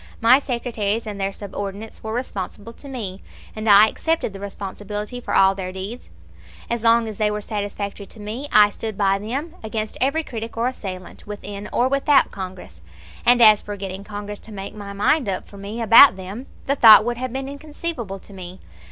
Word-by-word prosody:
My 240 +4 +6
secretaries 235 -5 -2
and 205 -2 -5
their 195 0 0
subordinates 200 +2 -7
were 220 - -4
responsible 225 -2 -5
to 280 - -11
me, 200 -8 -5 0.3
and 215 0 -2
I 205 +1 +8
accepted 320 -2 -1
the 195 - -8
responsibility 205 +3 -6
for - - -3
all 190 0 +6
their 190 -1 -5
deeds. 195 +6 -7 0.6
As 235 -1 -1
long 230 0 +4
as 215 -1 -7
they 210 -1 +2
were 210 0 -2
satisfactory 205 -1 -5
to 220 - -12
me 225 +8 -6
I 210 -1 +6
stood 220 -1 -6
by 195 -1 +2
them 270 +11 -4
against 215 -1 -4
every 280 +5 +1
critic 230 -4 -7
or 235 +2 +1
assailant, 190 -9 -7
within 205 0 -7
or 245 - +2
without 275 +1 +3
Congress; 185 -2 -8 0.5
and 245 0 +6
as 215 -2 +7
for 205 0 -7
getting 190 0 -6
Congress 205 0 -7
to 225 - -14
make 195 -1 -7
up 210 - -11
my 200 -1 -7
mind 210 +5 +1 0.2
for 200 - -14
me 210 +4 -5
about 230 +2 +9
them, 195 +7 -8 0.2
the 280 - +1
thought 220 -4 +9
would 240 0 -1
have 255 0 -4
been 265 +1 -4
inconceivable 285 - -5
to 200 - -15
me. 185 -1 -9
210 Hz, 195 wpm, -22 LUFS, 200-240 Hz, 0.6 s, about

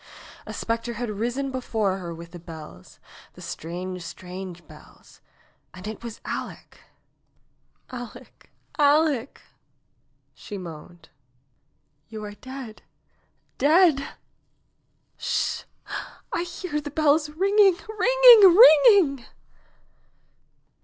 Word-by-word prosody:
A - - -6
specter 230 +1 -3
had 235 0 -4
risen 240 +6 -3
before 220 -7 -2
her 175 -2 -7
with 170 0 -10
the 175 - -10
bells 155 - -12 0.2
— - - -21
the - - -13
strange, 180 +3 -6
strange 180 -1 -9
bells 155 -1 -18 0.3
— - - -41
and 185 +2 -9
it 220 +2 -8
was 230 -2 -8
Aleck! - - -7 1.1
Aleck! 245 0 -11 0.3
Aleck 290 -3 +2 0.5
!" - - -46
she 205 - -7
moaned. 170 -1 -11 1.0
^Wou 215 -1 -7
are 205 - -9
dead 255 0 -10 0.4
— - - -44
dead 310 0 +4
I 275 - -9 1.1
Sh! - - -2 0.7
I 345 - -1
hear 345 -3 -5
the 290 - -7
bells 300 +1 +2
ringing, 390 +3 +3
ringing, 440 -4 +7
ringing 315 - +6
245 Hz, 110 wpm, -24 LUFS, 185-310 Hz, 1.1 s, ringing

